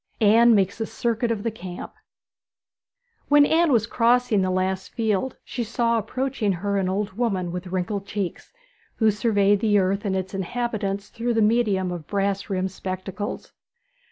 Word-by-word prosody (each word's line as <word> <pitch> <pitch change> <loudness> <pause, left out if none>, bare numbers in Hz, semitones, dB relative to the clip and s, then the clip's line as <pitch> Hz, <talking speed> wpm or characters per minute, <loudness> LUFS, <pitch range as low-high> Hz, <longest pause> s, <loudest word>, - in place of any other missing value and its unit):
ANNE 230 +2 +6
MAKES 200 +2 +1
A - - +1
CIRCUIT 235 0 -1
OF 220 -3 -2
THE 230 - -1
CAMP 180 -4 -8 1.4
When 290 0 +7
Anne 325 +1 +3
was 230 -4 +3
crossing 235 -2 +2
the 185 - 0
last 185 +1 -2
field, 225 +2 -1
she 245 - -4
saw 230 +1 +1
approaching 255 -2 -1
her 200 +3 -2
an 190 -2 0
old 200 +1 -2
woman 195 -6 -1
with 180 +1 -5
wrinkled 190 +2 -3
cheeks, 200 -4 -4 0.4
who 220 -2 +3
surveyed 205 -2 +2
the 210 -1 +3
earth 195 +1 +1
and 195 -3 -1
its 190 0 -3
inhabitants 200 0 -3
through 235 0 -2
the 225 - +3
medium 210 -5 +2
of 170 -4 -6
brass 200 0 -1
rimmed 190 -1 -1
spectacles. 190 +2 -5
205 Hz, 160 wpm, -24 LUFS, 190-230 Hz, 1.4 s, When